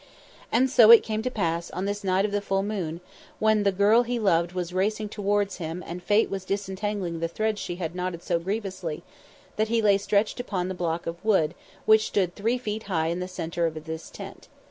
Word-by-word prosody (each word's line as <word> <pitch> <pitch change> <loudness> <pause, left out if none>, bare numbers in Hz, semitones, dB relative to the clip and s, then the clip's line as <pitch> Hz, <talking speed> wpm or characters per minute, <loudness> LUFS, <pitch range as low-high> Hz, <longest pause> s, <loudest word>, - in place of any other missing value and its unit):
And 250 +4 +4
so 245 -4 +6
it 230 -1 +10
came 215 0 -2
to 255 - -1
pass 170 -7 -2
on 185 +2 -4
this 205 +1 -3
night 190 +1 +2
of 210 - -2
the 205 0 0
full 195 -1 0
moon, 180 -5 -3 0.4
when 215 -1 +3
the 200 -1 +3
girl 205 +5 +4
he 245 0 -2
loved 175 -6 +2
was 180 -1 -4
racing 210 +3 0
towards 205 -1 0
him 165 +1 -5
and 175 +2 -6
Fate 205 +4 +3
was 195 -1 -4
disentangling 195 -2 -3
the 165 - 0
threads 215 +4 -2
she 175 - -4
had 170 -2 -4
knotted 180 -1 -4
so 170 -1 0
grievously, 185 -4 -4 0.5
that 215 +1 +2
he 230 +1 +1
lay 205 -2 +4
stretched 205 +3 +1
upon 190 -7 -2
the - - -2
block 170 -2 -2
of 170 +1 -6
wood 190 -8 +2 0.3
which 220 0 +5
stood 185 -3 0
three 230 +5 0
feet 220 -3 -4
high 160 -3 +1
in 170 +2 -2
the 180 - -3
centre 170 -2 -2
of 155 -1 -6
this 160 0 -6
tent. - - -10
195 Hz, 215 wpm, -26 LUFS, 175-215 Hz, 0.5 s, it